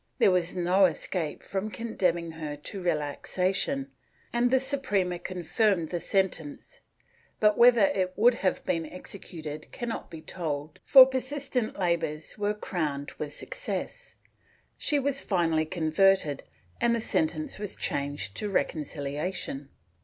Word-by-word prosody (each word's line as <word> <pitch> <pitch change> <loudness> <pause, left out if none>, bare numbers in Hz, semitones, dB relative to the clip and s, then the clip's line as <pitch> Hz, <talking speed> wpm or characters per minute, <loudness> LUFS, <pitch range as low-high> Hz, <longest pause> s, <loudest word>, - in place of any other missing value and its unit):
There - - +5
was 180 0 +1
no 180 +2 +4
escape 165 -2 -2
from 195 +2 -3
condemning 180 -6 -1
her 155 -2 -5
to 170 +6 -7
relaxation 185 - -1 0.4
and 240 +1 +3
the 260 +1 +4
Suprema 205 -10 0
confirmed 180 0 0
the 175 - -2
sentence, 175 -6 -2 0.6
but 210 -1 +4
whether 240 -2 +6
it 190 -1 +1
would 240 +3 +5
have 195 -5 -1
been 165 -2 -1
executed 155 -4 -8
cannot 240 -3 -5
be 165 - -8
told 150 -3 -4
for 265 -2 +10
persistent 260 -2 -2
labors 165 -4 -1
were 205 0 -1
crowned 150 -8 -3
with 150 -1 -3
success; - - -5 0.6
she 295 - +1
was 275 0 0
finally 165 -5 +1
converted 160 -1 +2 0.4
and 235 0 +3
the - - -1
sentence 155 -6 -1
was 210 -2 -2
changed 140 -7 -2
to 210 - -2
reconcihation. 150 -3 -2
185 Hz, 130 wpm, -28 LUFS, 155-215 Hz, 0.6 s, for